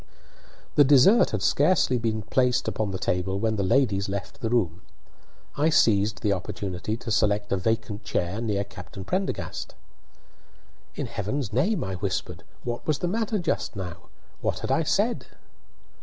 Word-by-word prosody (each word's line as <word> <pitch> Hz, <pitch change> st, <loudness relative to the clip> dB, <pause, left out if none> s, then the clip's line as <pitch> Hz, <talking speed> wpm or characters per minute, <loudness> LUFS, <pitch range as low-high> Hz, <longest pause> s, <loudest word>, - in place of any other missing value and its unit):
The 145 Hz, -, +7 dB
dessert 145 Hz, -, +6 dB
had 105 Hz, -3 st, -2 dB
scarcely 145 Hz, -5 st, +3 dB
been 110 Hz, -2 st, -1 dB
placed 125 Hz, +3 st, +1 dB
upon 110 Hz, -2 st, -1 dB
the 95 Hz, -, -3 dB
table 95 Hz, +1 st, -1 dB
when 110 Hz, +1 st, 0 dB
the 100 Hz, -, -1 dB
ladies 100 Hz, -2 st, +2 dB
left 100 Hz, 0 st, -5 dB
the 115 Hz, -, -1 dB
room. 95 Hz, -8 st, 0 dB, 0.7 s
I 150 Hz, +3 st, +3 dB
seized 105 Hz, -7 st, +3 dB
the 105 Hz, -2 st, +3 dB
opportunity 95 Hz, +2 st, -4 dB
to 115 Hz, -1 st, -6 dB
select 105 Hz, -1 st, +1 dB
a 100 Hz, -, +2 dB
vacant 105 Hz, +1 st, -1 dB
chair 90 Hz, +2 st, -2 dB
next 100 Hz, -3 st, -2 dB
Captain 95 Hz, -, -9 dB
Prendergast. 190 Hz, -, -3 dB, 1.2 s
"In -, -, -3 dB
heaven's 105 Hz, +4 st, -3 dB
name," 190 Hz, -, +1 dB
I 95 Hz, -, -4 dB
whispered, 95 Hz, 0 st, -3 dB, 0.2 s
"what 120 Hz, -1 st, -4 dB
was 155 Hz, -3 st, +2 dB
the 175 Hz, -, -2 dB
matter 220 Hz, +3 st, 0 dB
just 175 Hz, -, -2 dB
now? 90 Hz, -4 st, -7 dB, 0.3 s
What -, -, -1 dB
had -, -, -2 dB
I -, -, +3 dB
said?" -, -, 0 dB
110 Hz, 155 wpm, -26 LUFS, 100-130 Hz, 1.2 s, The